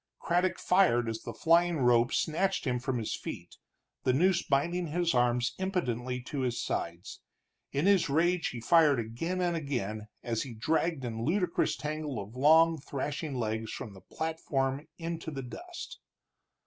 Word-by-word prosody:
Craddock 175 +2 +1
fired 150 -11 +3
as 115 0 -3
the - - -6
flying 170 +1 +3
rope 120 -2 +4
snatched 190 +4 0
him 125 -2 0
from 130 0 -2
his 110 -2 -2
feet, - - -8 0.5
the 130 - +3
noose 175 +5 +3
binding 170 +5 0
his 170 +2 0
arms 120 0 +2
impotently 130 -10 -1
to 135 +3 -5
his 125 -2 -1
sides; 85 +3 -4 0.5
in 140 +5 0
his 195 -6 +4
rage 170 +4 +2
he 120 - -5
fired 150 +1 +4
again 145 +12 -3
and 175 -1 +1
again 110 -9 -3 0.2
as 115 -2 -1
he 125 -4 -6
dragged 160 +3 0
in 115 -1 -4
ludicrous 180 - +1
tangle 150 -1 -4
of 100 +4 -8
long, 160 +4 +5
thrashing 140 +2 -4
legs 110 -2 -2
from 105 - -6
the 95 - -13
platform 145 -3 -2
into 165 -1 -4
the 135 -3 -5
dust. 350 - -8
140 Hz, 160 wpm, -30 LUFS, 120-170 Hz, 0.5 s, long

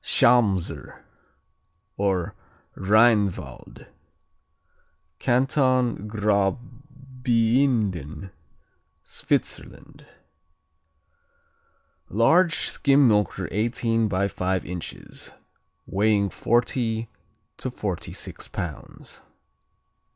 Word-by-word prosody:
Schamser, 105 -7 +2 0.9
or 95 -4 -1 0.4
Rheinwald 105 -1 +1 1.3
Canton 130 -3 +1
Graubiinden, 115 - -1 0.7
Switzerland - - -4 2.0
Large 165 - +3
skim 140 -1 +3
milker 105 -4 +1
eighteen 115 +1 0
by 100 0 0
five 95 -1 -2
inches, 90 -1 -7 0.5
weighing 100 0 +1
forty 115 -1 0 0.5
to - - -4
forty - - -4
six - - -8
pounds. 80 -4 -8
110 Hz, 55 wpm, -24 LUFS, 100-125 Hz, 2.0 s, Large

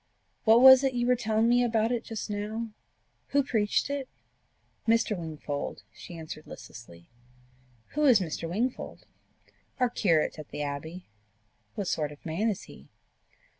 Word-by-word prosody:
"What 225 +2 +6
was 260 0 +10
it 265 -2 +1
you 240 0 +1
were 250 0 +4
telling 220 -1 +1
me 245 +1 +4
about 225 -1 +1
it 240 -2 -1
just 225 -2 -5
now? 215 +2 -4 0.6
Who 280 0 +2
preached 220 -6 +1
it?" 280 -2 -4 0.8
"Mr. 225 -1 +3
Wingfold," 155 -4 -5
she 170 - -10
answered 155 -1 -8
listlessly. 85 -7 -12 0.8
"Who 300 +1 0
is 250 -6 +7
Mr. 165 -2 -4
Wingfold?" 235 +8 -3 0.7
"Our 250 -2 +2
curate 165 -8 +1
at 150 - -9
the 150 - -4
Abbey." 160 +5 -6 0.7
"What 200 - -3
sort 150 -4 -1
of 145 - -15
man 175 +8 0
is 205 - -3
he?" 70 - -14
215 Hz, 150 wpm, -28 LUFS, 160-240 Hz, 0.8 s, was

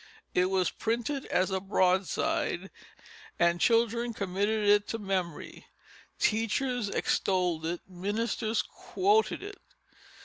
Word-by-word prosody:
It 180 - +3
was 190 -1 +1
printed 240 +5 -2
as 185 +2 +1
a 190 - 0
broadside, 190 -1 0 0.7
and 170 0 +2
children 235 0 +2
committed 205 +2 0
it 205 0 +5
to 225 - -3
memory; 190 -6 -4 0.5
teachers 225 +1 0
extolled 180 -5 0
it; 170 +1 -3
ministers 215 +4 -1
quoted 410 +4 0
it. 410 0 -9
205 Hz, 105 wpm, -29 LUFS, 185-230 Hz, 0.7 s, it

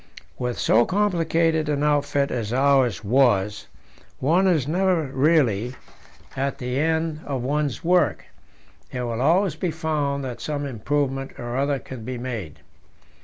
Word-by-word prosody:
With 125 -1 -2
so 115 +2 +4
complicated 165 - +1
an 145 -1 0
outfit 145 -1 +1
as 115 -3 -3
ours 130 -5 +2
was, 105 -3 +2 0.5
one 170 +8 +2
is 155 -8 +2
never 180 0 +2
really 130 -5 +1 0.6
at 135 +1 -2
the 125 0 -2
end 160 0 0
of 135 -4 -3
one's 145 +2 -1
work; 180 +1 +2 0.7
it 125 - -4
will 120 0 -3
always 175 +5 +3
be 175 +3 -2
found 150 -3 -1
that 125 -2 -6
some 145 -1 -3
improvement 135 +2 -2
or 120 0 -5
other 140 +1 +1
can 130 -3 -9
be 125 +2 -5
made. 115 - -6
140 Hz, 140 wpm, -23 LUFS, 125-160 Hz, 0.7 s, so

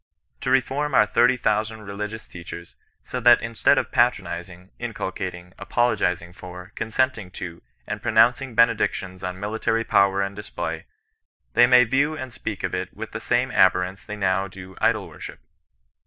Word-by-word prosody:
To 130 - -3
reform 135 +2 +1
our 105 - +6
thirty 120 +4 +3
thousand 110 0 -1
religious 105 +2 -6
teachers, 85 0 -10 0.3
so 125 - -4
that 120 0 +7
instead 115 -1 +2
of - - -1
patronizing, 90 +1 -1
incul - - -4
cating, 90 +1 -6
apologizing 100 -5 0
for, 90 +1 -10
consenting 115 -3 -1
to, 85 -1 -7 0.2
and - - -5
pronouncing 120 +2 +3
benedictions 105 -5 +1
on 90 0 -4
military 110 +2 -1
power 100 -2 +3
and 100 0 -4
display, 105 +1 -5 0.7
they 120 +1 +6
may 125 0 +7
view 140 +6 +1
and 130 -5 -7
speak 105 -5 -5
of - - -2
it - - -4
with - - -6
the - - -5
same - - 0
abhorrence 90 +1 +3
they 105 0 -7
now 95 -1 +1
do 95 0 -11
idol - - +2
worship. - - -9
105 Hz, 155 wpm, -24 LUFS, 95-120 Hz, 0.7 s, that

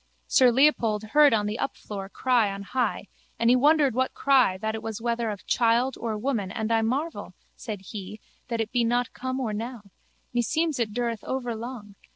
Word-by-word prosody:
Sir 255 -1 +5
Leopold 235 -5 +3
heard 290 +7 +5
on 210 -2 +2
the 210 +2 -3
upfloor 195 -7 -5
cry 240 -5 +2
on 200 0 -6
high 235 -2 -2 0.3
and 230 +1 +3
he - - +6
wondered 290 0 +4
what 260 +2 -1
cry 260 -9 +3
that 220 +3 -2
it 220 - -5
was 220 -2 -5
whether 235 0 -1
of 205 -2 -6
child 235 +2 +2
or 225 -2 -3
woman 215 -4 -1
and 220 +2 -3
I 225 0 +3
marvel, 275 +9 -2 0.2
said 215 -5 -6
he, 200 +1 -8 0.3
that 230 -2 -3
it 220 -1 -2
be 245 -1 +2
not 240 +1 0
come 260 +1 -4
or 230 -5 -2
now. 230 +1 -5 0.5
Meseems 300 +5 0
it 225 -3 0
dureth 235 -1 -2
overlong. 240 -4 -5
230 Hz, 190 wpm, -26 LUFS, 215-255 Hz, 0.5 s, he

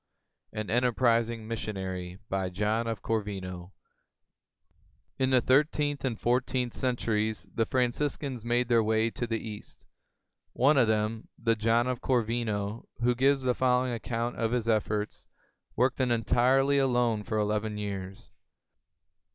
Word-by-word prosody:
AN 110 -1 -4
ENTERPRISING 115 -2 +2
MISSIONARY 95 -5 -4
[In 95 -1 0
the 105 -3 -2 1.7
thirteenth 145 +1 +2
and 125 -4 -2
fourteenth 125 0 0
centuries 110 -4 -1
the 115 -2 0
Franciscans 130 0 -1
made 120 +1 +1
their 120 -2 +4
way 110 +1 +1
to 120 - -4
the 115 0 -1
East. 110 -2 -9 0.7
One 140 +4 +4
of 120 - +4
them, 110 +1 -1
the 115 -1 +1
John 115 +2 +2
of 125 -1 -2
Cor 125 -3 +2
vino 110 -1 -3
who 125 +1 +3
gives 135 +2 +2
the 125 -1 +2
following 125 0 +1
account 115 +1 -3
of 115 0 0
his 120 -2 -1
efforts, 105 -1 -1 0.5
worked 125 +2 +1
entirely 130 +3 +3
alone 120 -5 +2
for 110 +1 -3
eleven 105 0 -1
years. 95 -2 -6
115 Hz, 120 wpm, -29 LUFS, 105-125 Hz, 1.7 s, their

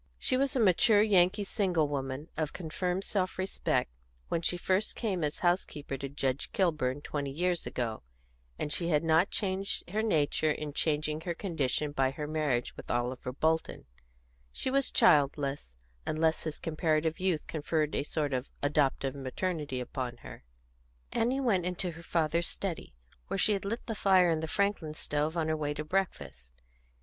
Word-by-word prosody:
She 255 - +1
was 275 +2 +1
a - - +2
mature 210 +1 +5
Yankee 200 -1 +4
single 185 -6 +1
woman, 135 +1 -3
of 155 -2 -2
confirmed 180 +2 -2
self 185 -3 -1
respect, 185 - 0 0.4
when 165 - 0
she 175 - +1
first 190 +4 0
came 195 -8 -1
as 150 0 -1
house 175 +2 +4
keeper 145 -2 -7
to 140 +1 -5
Judge 135 -1 -2
Kilburn, 150 - +1
twenty 145 -1 -3
years 175 +4 0
ago, 115 -3 -3 0.6
and 150 - -1
she 170 - +1
had 155 -2 +2
not 165 +4 +4
changed 195 0 -1
her 215 +2 +1
nature 155 -7 +2
in 150 -1 -2
changing 150 0 0
her 170 0 -3
condition 150 -5 -1
by 135 -2 +2
her 150 +3 -5
marriage 150 -5 -1
with - - -11
Oliver 125 +1 -1
Bolton; 160 +4 0 0.7
she 260 - -2
was 275 0 +2
childless, 140 - +3 0.3
unless 160 +1 +1
his 155 -2 -3
comparative 160 0 0
youth 180 -4 0
conferred 155 -1 -1
a - - +1
sort 145 0 -2
of 130 +1 -2
adoptive 140 -2 +1
maternity 140 0 -3
upon 125 -1 -4
her. - - -10 0.7
Annie 250 +4 +1
went 205 -9 +2
into 180 0 -2
her 165 +1 -11
father's 170 0 +1
study, 180 - -5 0.3
where - - -2
she 210 - +4
had 200 -1 -2
lit 230 +4 -3
the 225 - -3
fire 185 -4 +4
in 160 - +1
the 160 - -3
Franklin 190 -4 0
stove 150 +2 -1
on 160 -1 +1
her 155 - +1
way 150 -1 -2
to 155 - -3
breakfast. 150 - -3
160 Hz, 170 wpm, -30 LUFS, 145-185 Hz, 0.7 s, mature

